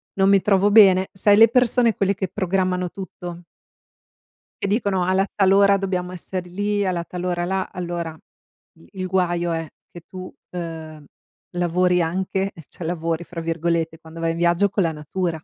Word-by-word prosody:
Non 195 Hz, 0 st, +3 dB
mi 195 Hz, -1 st, +5 dB
trovo 200 Hz, 0 st, +3 dB
bene. 190 Hz, -3 st, +6 dB
Sai 205 Hz, +2 st, +3 dB
le 225 Hz, -, +8 dB
persone 240 Hz, -3 st, +3 dB
quelle 200 Hz, 0 st, +1 dB
che 190 Hz, -1 st, -3 dB
programmano 185 Hz, -1 st, -1 dB
tutto 175 Hz, -3 st, -8 dB, 1.2 s
e -, -, +1 dB
dicono: 200 Hz, -3 st, 0 dB
"Alla 190 Hz, +2 st, +2 dB
tal 195 Hz, -2 st, +3 dB
ora 200 Hz, 0 st, +5 dB
dobbiamo 185 Hz, -2 st, -2 dB
esser 185 Hz, 0 st, -6 dB
lì, 205 Hz, +3 st, -1 dB
alla 175 Hz, -2 st, -1 dB
tal 180 Hz, +1 st, -7 dB
ora 175 Hz, -1 st, -1 dB
là." 190 Hz, +1 st, -1 dB
Allora 170 Hz, -2 st, -4 dB, 0.6 s
i 85 Hz, -, -20 dB
il 185 Hz, -1 st, -4 dB
guaio 175 Hz, -2 st, 0 dB
è 165 Hz, -1 st, -3 dB, 0.2 s
che 175 Hz, -, -11 dB
tu, 185 Hz, -1 st, -9 dB, 0.2 s
uhm, 160 Hz, -3 st, -7 dB, 0.5 s
lavori 180 Hz, +1 st, +2 dB
anche, 190 Hz, +3 st, -2 dB, 0.2 s
cioè 170 Hz, -, -8 dB
"lavori" 165 Hz, 0 st, -2 dB
fra 170 Hz, -1 st, -7 dB
virgolette, 165 Hz, 0 st, -1 dB
quando 160 Hz, 0 st, -12 dB
vai 165 Hz, 0 st, 0 dB
in 165 Hz, -, -4 dB
viaggio 175 Hz, +4 st, +2 dB
con 200 Hz, 0 st, 0 dB
la 165 Hz, -, +1 dB
natura. 160 Hz, +2 st, -4 dB
180 Hz, 170 wpm, -22 LUFS, 170-195 Hz, 1.2 s, le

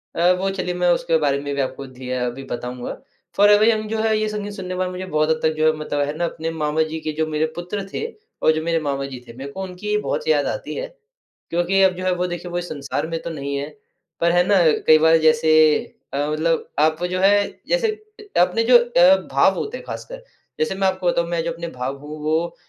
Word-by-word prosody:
अ, 175 Hz, +2 st, +4 dB
वो 195 Hz, +1 st, 0 dB
चलिए 180 Hz, -1 st, -2 dB
मैं 180 Hz, 0 st, +1 dB
उसके 165 Hz, -1 st, +2 dB
बारे 140 Hz, -2 st, +1 dB
में 145 Hz, 0 st, -4 dB
भी 140 Hz, -, 0 dB
आपको 135 Hz, +1 st, -4 dB
धी 130 Hz, 0 st, -10 dB
अ, 125 Hz, -1 st, -1 dB
अभी 125 Hz, +3 st, -5 dB
बताऊँगा। 125 Hz, 0 st, -5 dB, 0.5 s
Forever 205 Hz, +1 st, +6 dB
Young 215 Hz, -1 st, 0 dB
जो 220 Hz, 0 st, -2 dB
है 220 Hz, -1 st, +2 dB
ये 215 Hz, -, 0 dB
संगीत 205 Hz, -1 st, -5 dB
सुनने 190 Hz, -3 st, -7 dB
के 185 Hz, -, -3 dB
बाद 185 Hz, 0 st, -1 dB
मुझे 185 Hz, +1 st, -6 dB
बहुत 155 Hz, -3 st, 0 dB
हद 160 Hz, 0 st, +2 dB
तक 160 Hz, 0 st, +2 dB
जो 155 Hz, -, +2 dB
है 155 Hz, -, +4 dB
मतलब 150 Hz, -1 st, -3 dB
है 145 Hz, -, -3 dB
ना 175 Hz, -, 0 dB
अपने 165 Hz, -1 st, -4 dB
मामा 155 Hz, -1 st, -1 dB
जी 160 Hz, -, -3 dB
के 155 Hz, -, -3 dB
जो 160 Hz, +1 st, 0 dB
मेरे 155 Hz, 0 st, 0 dB
पुत्र 180 Hz, +3 st, -4 dB
थे 450 Hz, -, -2 dB, 0.4 s
और -, -, +5 dB
जो 155 Hz, -, -1 dB
मेरे 165 Hz, 0 st, +1 dB
मामा 140 Hz, -3 st, -2 dB
जी 130 Hz, -2 st, -7 dB
थे, 115 Hz, -, -10 dB
मेरे 135 Hz, +3 st, -8 dB
को 190 Hz, +6 st, -5 dB
उनकी 190 Hz, +3 st, -3 dB
बहुत 470 Hz, -, -3 dB
याद 475 Hz, -, +3 dB
आती -, -, -4 dB
है। -, -, -4 dB, 0.6 s
क्योंकि 175 Hz, +3 st, +1 dB
अब 185 Hz, -1 st, +4 dB
जो 185 Hz, -, -6 dB
है 185 Hz, -, +2 dB
वो 180 Hz, +1 st, -1 dB
देखिए 175 Hz, 0 st, -6 dB
वो 175 Hz, -, -2 dB
इस 175 Hz, 0 st, -4 dB
संसार 145 Hz, +1 st, -3 dB
में 165 Hz, 0 st, -4 dB
तो -, -, -4 dB
नहीं 140 Hz, -3 st, -4 dB
है। 145 Hz, +2 st, -4 dB, 0.5 s
पर 170 Hz, 0 st, +4 dB
है 175 Hz, 0 st, +4 dB
ना 200 Hz, -, +4 dB, 0.3 s
कई 155 Hz, -, +8 dB
बार 160 Hz, +1 st, +5 dB
जैसे 155 Hz, 0 st, +3 dB, 0.6 s
अ, -, -, -2 dB
मतलब 165 Hz, +2 st, 0 dB
आप 155 Hz, +2 st, +2 dB
जो 185 Hz, -, -1 dB
है 205 Hz, +1 st, +5 dB, 0.2 s
जैसे -, -, +2 dB, 0.5 s
अपने 185 Hz, +6 st, +2 dB
जो 245 Hz, +1 st, +7 dB
अ, 190 Hz, -6 st, +5 dB, 0.2 s
भाव 140 Hz, +8 st, +4 dB
होते 475 Hz, +4 st, -4 dB
हैं -, -, -12 dB
ख़ासकर -, -, -7 dB, 0.4 s
जैसे 155 Hz, +5 st, 0 dB
मैं 195 Hz, 0 st, +1 dB
आपको 185 Hz, -1 st, -1 dB
बताऊँ 170 Hz, -1 st, +1 dB
मैं 170 Hz, -1 st, -1 dB
जो 170 Hz, -, -2 dB
अपने 170 Hz, +1 st, -6 dB
भाव 135 Hz, +2 st, -3 dB
हूँ 150 Hz, +2 st, -9 dB
वो 165 Hz, +2 st, 0 dB
170 Hz, 250 wpm, -21 LUFS, 155-190 Hz, 0.6 s, कई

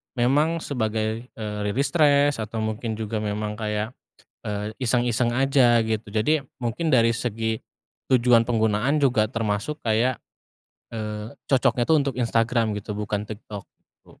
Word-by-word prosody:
memang 150 Hz, +7 st, +2 dB
sebagai, 110 Hz, -2 st, -2 dB
eee, 105 Hz, -1 st, -5 dB
rilis 130 Hz, +8 st, 0 dB
stres 145 Hz, -5 st, +4 dB
atau 110 Hz, +1 st, -3 dB
mungkin 110 Hz, +1 st, -3 dB
juga 110 Hz, 0 st, -3 dB
memang 105 Hz, 0 st, -3 dB
kayak, 105 Hz, +1 st, -2 dB, 0.5 s
eee, 105 Hz, +1 st, -4 dB
iseng-iseng 120 Hz, 0 st, +1 dB
aja 130 Hz, -2 st, +4 dB
gitu. 110 Hz, -2 st, -2 dB
Jadi 140 Hz, +7 st, +1 dB, 0.2 s
mungkin 125 Hz, +7 st, -1 dB
dari 115 Hz, -2 st, +5 dB
segi 110 Hz, -1 st, -2 dB, 0.6 s
tujuan 120 Hz, -2 st, +5 dB
penggunaan 115 Hz, +4 st, +1 dB
juga 120 Hz, -6 st, +3 dB
termasuk 115 Hz, +6 st, -2 dB
kayak, 115 Hz, +3 st, +1 dB, 0.7 s
eee, 105 Hz, 0 st, -5 dB, 0.2 s
cocoknya 125 Hz, -2 st, +2 dB
tuh 160 Hz, -, +5 dB
untuk 140 Hz, -2 st, -1 dB
Instagram 115 Hz, -1 st, +1 dB
gitu, 105 Hz, +1 st, -6 dB
bukan 105 Hz, 0 st, -2 dB
TikTok 105 Hz, -2 st, -8 dB, 0.2 s
gitu. -, -, -24 dB
115 Hz, 135 wpm, -24 LUFS, 110-125 Hz, 0.7 s, dari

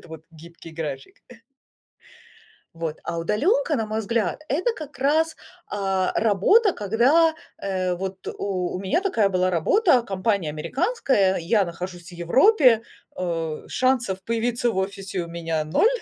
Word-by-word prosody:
это -, -, -17 dB
вот 160 Hz, -1 st, -10 dB
гибкий 165 Hz, +1 st, -13 dB
график. 150 Hz, -4 st, -6 dB, 1.6 s
Вот, 165 Hz, -2 st, -4 dB
а 170 Hz, -, -3 dB
удаленка, 310 Hz, -, +1 dB
на 225 Hz, -, -2 dB
мой 215 Hz, +1 st, -2 dB
взгляд, 225 Hz, -, -1 dB
это 355 Hz, -, 0 dB
как 300 Hz, -, -10 dB
раз, 315 Hz, +4 st, +2 dB, 0.3 s
а, 195 Hz, -2 st, -1 dB
работа, 230 Hz, -, +4 dB
когда, 265 Hz, -, +3 dB, 0.2 s
э, 185 Hz, -2 st, -1 dB
вот 190 Hz, +1 st, -6 dB
У 185 Hz, -3 st, -2 dB
у -, -, -5 dB
меня 195 Hz, -, 0 dB
такая 230 Hz, -, +1 dB
была 185 Hz, 0 st, +1 dB
работа, 250 Hz, -, +3 dB
компания 195 Hz, -4 st, -1 dB
американская, 230 Hz, -, 0 dB
я 195 Hz, +5 st, +2 dB
нахожусь 175 Hz, 0 st, -7 dB
в -, -, -16 dB
Европе, 245 Hz, -, +4 dB, 0.3 s
а, 165 Hz, -3 st, -3 dB
шансов 245 Hz, -7 st, 0 dB
появиться 235 Hz, +1 st, 0 dB
в 225 Hz, -, -5 dB
офисе 190 Hz, 0 st, -3 dB
у 170 Hz, -, -8 dB
меня 165 Hz, -2 st, -2 dB
0, 165 Hz, -, +3 dB
195 Hz, 140 wpm, -24 LUFS, 175-255 Hz, 1.6 s, работа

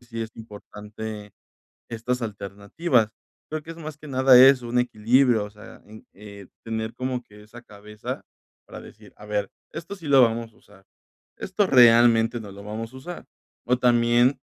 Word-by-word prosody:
sí 120 Hz, -2 st, -8 dB
es 110 Hz, -, -7 dB
importante 105 Hz, -1 st, -9 dB, 0.6 s
estas 120 Hz, +2 st, -3 dB
alternativas. 105 Hz, -, -1 dB, 0.4 s
Creo 155 Hz, 0 st, -5 dB
que 165 Hz, -, -9 dB
es 165 Hz, -, -12 dB
más 155 Hz, -2 st, -8 dB
que 150 Hz, -, -13 dB
nada 130 Hz, -2 st, +5 dB
eso, 130 Hz, -2 st, +6 dB
un 125 Hz, +1 st, 0 dB
equilibrio, 120 Hz, 0 st, +2 dB
o 105 Hz, -, -10 dB
sea, 105 Hz, 0 st, -15 dB
un, 110 Hz, +1 st, -15 dB
eh, 100 Hz, -1 st, -13 dB, 0.2 s
tener 110 Hz, 0 st, -4 dB
como 130 Hz, -1 st, -4 dB
que 105 Hz, -1 st, -17 dB
esa 120 Hz, +3 st, -14 dB
cabeza 105 Hz, -1 st, -9 dB, 0.4 s
para -, -, -10 dB
decir: -, -, -16 dB
"A 105 Hz, -, -14 dB
ver, 105 Hz, -2 st, -2 dB, 0.2 s
esto 170 Hz, +5 st, -7 dB
sí 170 Hz, -6 st, -10 dB
lo 135 Hz, -2 st, +6 dB
vamos 115 Hz, 0 st, -1 dB
a -, -, -26 dB
usar, 95 Hz, -1 st, -22 dB, 0.5 s
esto 195 Hz, +2 st, -1 dB
realmente 120 Hz, -3 st, +5 dB
no 105 Hz, -3 st, -10 dB
lo 100 Hz, +1 st, -12 dB
vamos 115 Hz, +3 st, -6 dB
a -, -, -12 dB
usar", 170 Hz, +7 st, -9 dB, 0.4 s
o 125 Hz, +1 st, +1 dB
también 120 Hz, +1 st, +3 dB
115 Hz, 175 wpm, -24 LUFS, 105-130 Hz, 0.6 s, eso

